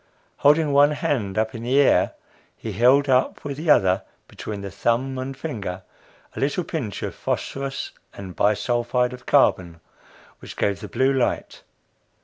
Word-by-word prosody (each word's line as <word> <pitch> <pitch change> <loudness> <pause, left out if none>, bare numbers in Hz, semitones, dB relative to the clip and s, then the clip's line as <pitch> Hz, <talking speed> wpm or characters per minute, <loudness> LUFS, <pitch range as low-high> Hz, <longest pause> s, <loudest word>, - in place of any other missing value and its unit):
Holding 150 0 +3
one 145 +1 +5
hand 110 -10 -2
up 110 0 0
in 115 - -7
the 125 +4 +2
air, 140 - +3 0.4
he 110 - -6
held 125 +7 +4
up 130 -1 +1
with 140 -1 -4
the 155 +1 -4
other, 95 -9 +4 0.3
between 105 -2 -7
the 100 -1 -6
thumb 130 +7 -1
and 130 +1 -5
finger, 100 - -5 0.5
a - - -5
little 145 +6 0
pinch 125 - -5
of - - -3
phosphorus 135 0 -4 0.2
and 95 -3 -9
bi 105 +1 +3
sulphide 120 +2 0
of 125 - -12
carbon, 90 - +2 0.6
which - - -11
gave 100 -1 0
the - - -7
blue 135 +1 +1
light. 130 -2 -1
125 Hz, 160 wpm, -23 LUFS, 105-140 Hz, 0.6 s, one